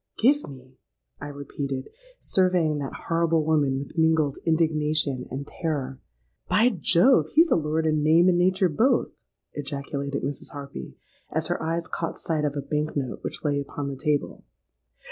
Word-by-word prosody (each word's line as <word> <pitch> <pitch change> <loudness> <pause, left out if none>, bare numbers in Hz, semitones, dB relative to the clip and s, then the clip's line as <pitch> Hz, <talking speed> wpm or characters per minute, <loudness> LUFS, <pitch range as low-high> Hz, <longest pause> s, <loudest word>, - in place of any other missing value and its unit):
'—'Give 285 - +3
me!' 130 -1 -14 0.4
I 145 - -6
repeated, 140 -1 -5 0.3
surveying 180 -5 +2
that 140 -2 -6
horrible 165 -2 +2
woman 145 -4 +2
with 140 +4 -5
mingled 160 -3 +2
indignation 155 -4 +1
and 135 +2 -5
terror.—'By 135 - -2
Jove, 245 - +4
he's 330 +2 +5
a - - +6
lord 160 0 0
in 155 -1 +2
name 160 +4 +5
and 175 -1 +4
nature 185 +1 +3
both!' 220 - +2 0.4
ejaculated 140 0 -4
Mrs. 140 0 -4
Harpy, 140 - -8 0.3
as 160 +1 -1
her 175 - -1
eyes 165 +1 -1
caught 165 - -4
sight 155 -2 -1
of 145 -1 -1
a 145 - -2
bank 150 +1 -2
note 130 -3 -3
which - - -6
lay 145 -2 +1
upon 140 0 -4
the 140 - -5
table. 145 +2 -1
150 Hz, 155 wpm, -25 LUFS, 140-165 Hz, 0.4 s, a